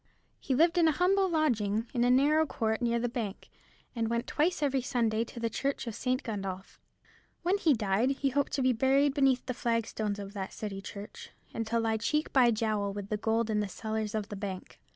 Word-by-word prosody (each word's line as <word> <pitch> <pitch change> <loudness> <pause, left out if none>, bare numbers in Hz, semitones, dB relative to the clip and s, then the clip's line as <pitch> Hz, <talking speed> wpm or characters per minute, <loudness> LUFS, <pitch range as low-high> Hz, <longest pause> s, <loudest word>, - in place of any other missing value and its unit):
He 265 - -1
lived 335 +5 +4
in 330 - +5
a 315 - +3
humble 380 +4 +2
lodging, 230 - +1
in 240 -2 +1
a 245 - +3
narrow 295 +5 +4
court 220 -3 -1
near 235 -1 +1
the 240 +1 0
bank, 230 -5 -5 0.4
and 225 -1 -1
went 235 +1 -1
twice 305 +1 0
every 275 -2 +1
Sunday 230 -3 0
to 235 - -9
the 230 - 0
church 275 +5 -2
of 230 - -4
St. 255 +4 -1
Gundolph. 195 -4 -5 0.6
When 375 +4 +2
he 315 -7 +4
died 215 +3 +1
he 275 0 0
hoped 280 +1 0
to 270 - 0
be 255 0 +4
buried 270 +4 +3
beneath 270 -3 +2
the 255 - -2
flagstones 225 -3 -1
of 200 -1 -7
that 195 -2 -5
City 200 -2 -5
church, 200 +1 -9 0.2
and 225 -1 -3
to 230 +1 +1
lie 225 -1 +1
cheek 300 +7 -1
by 255 -3 +6
jowl 215 -3 0
with 200 0 -6
the 210 - 0
gold 225 +1 0
in 210 - +1
the 205 -1 -1
cellars 220 +1 -3
of 210 -1 -3
the 205 - -5
bank. 195 -2 -6
235 Hz, 215 wpm, -30 LUFS, 215-270 Hz, 0.6 s, by